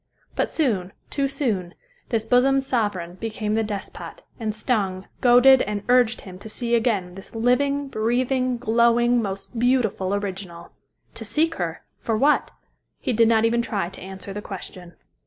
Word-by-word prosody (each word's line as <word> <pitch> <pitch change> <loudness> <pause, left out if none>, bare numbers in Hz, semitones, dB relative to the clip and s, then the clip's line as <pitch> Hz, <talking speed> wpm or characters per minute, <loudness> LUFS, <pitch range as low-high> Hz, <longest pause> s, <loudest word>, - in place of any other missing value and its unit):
But - - 0
soon, 205 - 0 0.2
too 280 -1 0
soon, 225 -11 -2 0.3
this 225 -3 0
bosom's 265 +3 +3
sovereign 195 -8 -1
became 215 -1 -2
the 220 - +2
despot, 210 -3 -6 0.2
and 215 -2 -2
stung, 200 -4 -1
goaded 255 +2 +7
and 205 0 -2
urged 245 -2 +4
him 185 -1 -11
to 220 - -8
see 235 +2 -3
again 220 -7 +1
this 195 +4 -11
living, 275 +5 +1
breathing, 255 +2 0
glowing, 235 +1 +3
most 200 +3 -5
beautiful 225 -6 +1
original. 190 -4 -6 0.4
To - - -7
seek 325 +2 +1
her? 165 -1 -3 0.2
For 225 -2 -1
what? 290 +6 +3 0.5
He 255 - -1
did 230 0 +4
not 225 -1 +4
even 235 +1 +2
try 200 -7 -2
to - - -11
answer 190 +1 -7
the 210 - -5
question. 180 -3 -9
225 Hz, 155 wpm, -23 LUFS, 195-245 Hz, 0.5 s, goaded